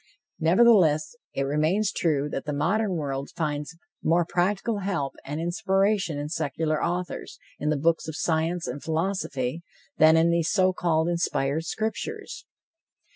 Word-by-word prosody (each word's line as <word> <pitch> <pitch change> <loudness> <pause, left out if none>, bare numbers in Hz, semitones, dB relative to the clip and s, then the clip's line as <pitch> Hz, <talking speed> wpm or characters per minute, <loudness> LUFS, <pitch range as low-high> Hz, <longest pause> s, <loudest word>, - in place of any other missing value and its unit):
Nevertheless, 170 -4 +4 0.2
it 135 - 0
remains 155 +9 +1
true 150 -4 0
that - - -4
the 150 - -2
modern 185 +7 +1
world 140 -3 -3
finds 150 0 -3 0.3
more 170 +1 +3
practical 195 +5 0
help 185 -9 -2
and 145 +3 -5
inspiration 195 0 +1
in 145 +1 -3
secular 155 0 -1
authors, 175 +1 -3 0.2
in 150 - -1
the 155 - +1
books 165 +3 +1
of 160 - -5
science 165 +2 0
and 135 +3 -5
philosophy, 160 -5 -2 0.4
than 160 +1 +7
in 165 +1 +4
these 170 -1 +1
so 185 -2 +3
called 165 -2 +1
inspired 160 -3 0
scriptures. 400 - -4
165 Hz, 140 wpm, -26 LUFS, 150-185 Hz, 0.4 s, than